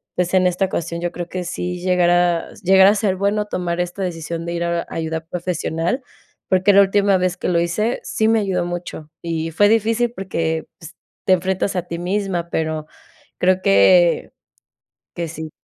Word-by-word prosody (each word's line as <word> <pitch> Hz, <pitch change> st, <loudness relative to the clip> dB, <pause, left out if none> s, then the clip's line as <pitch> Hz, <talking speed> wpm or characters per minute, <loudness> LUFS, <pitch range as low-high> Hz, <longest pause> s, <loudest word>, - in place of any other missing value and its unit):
pues 180 Hz, +1 st, -1 dB
en 185 Hz, -1 st, +4 dB
esta 180 Hz, +2 st, +1 dB
ocasión 170 Hz, -2 st, -4 dB
yo 175 Hz, 0 st, -2 dB
creo 175 Hz, 0 st, -6 dB
que 185 Hz, -1 st, -4 dB
sí 180 Hz, 0 st, -4 dB
llegar 180 Hz, -1 st, +3 dB
a 175 Hz, -1 st, +2 dB
s -, -, -17 dB
llegar 190 Hz, +1 st, +6 dB
a 205 Hz, -, +5 dB
ser 200 Hz, -2 st, 0 dB
bueno 205 Hz, +2 st, 0 dB
tomar 175 Hz, -3 st, -3 dB
esta 180 Hz, +2 st, -4 dB
decisión 165 Hz, -2 st, -4 dB
de 170 Hz, -, -3 dB
ir 170 Hz, 0 st, -2 dB
a 170 Hz, 0 st, 0 dB
a -, -, -9 dB
ayuda 160 Hz, 0 st, -3 dB
profesional. 175 Hz, -, -2 dB, 0.5 s
Porque 185 Hz, +2 st, +3 dB
la 200 Hz, -, +8 dB
última 200 Hz, 0 st, +3 dB
vez 180 Hz, -1 st, -1 dB
que -, -, -3 dB
lo 170 Hz, -1 st, +2 dB
hice, 210 Hz, +8 st, 0 dB
sí 220 Hz, -, 0 dB
me 225 Hz, 0 st, +4 dB
ayudó 190 Hz, -4 st, -1 dB
mucho. 175 Hz, -3 st, -6 dB
Y 165 Hz, -1 st, -2 dB
fue 205 Hz, +6 st, +4 dB
difícil 225 Hz, +2 st, +1 dB
porque, 165 Hz, -4 st, -2 dB
pues, 165 Hz, -, -12 dB, 0.3 s
te 185 Hz, -, +5 dB
enfrentas 190 Hz, +2 st, 0 dB
a 180 Hz, -, +1 dB
ti 170 Hz, -, -4 dB
misma, 180 Hz, -2 st, -2 dB
pero 155 Hz, -1 st, -2 dB, 0.5 s
creo 185 Hz, +1 st, +2 dB
que 165 Hz, -, +4 dB, 0.8 s
que 170 Hz, -1 st, -4 dB
sí. 160 Hz, 0 st, -7 dB
180 Hz, 190 wpm, -20 LUFS, 170-195 Hz, 0.8 s, la